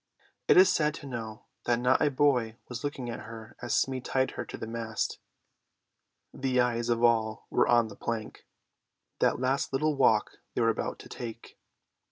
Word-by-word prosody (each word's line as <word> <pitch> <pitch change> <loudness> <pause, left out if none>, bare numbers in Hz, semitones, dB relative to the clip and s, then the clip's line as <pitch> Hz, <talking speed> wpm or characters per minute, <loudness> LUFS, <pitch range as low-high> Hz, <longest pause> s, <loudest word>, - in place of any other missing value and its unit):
It - - +6
is 185 +1 +7
sad 150 -1 +1
to 145 - -9
know 115 -5 -6 0.2
that 120 -1 +2
not 125 +2 +3
a 150 - +4
boy 130 -5 +2
was 125 -1 -6
looking 145 -4 -3
at - - -6
her 110 -1 -10
as 120 -2 0
Smee 130 -1 0
tied 130 +1 0
her - - -5
to - - -8
the - - -5
mast; 115 -1 -3 1.1
the 130 -1 0
eyes 120 -1 +1
of 120 0 +1
all 110 -2 +2
were - - +3
on 120 -2 +4
the 100 - -10
plank: 110 -1 -5 0.7
that - - +2
last 130 +2 0
little 150 +3 +1
walk 110 -6 +2 0.2
they - - +1
were 115 - +4
about 115 - -2
to - - -12
take. 115 -1 -8
120 Hz, 185 wpm, -29 LUFS, 115-135 Hz, 1.1 s, is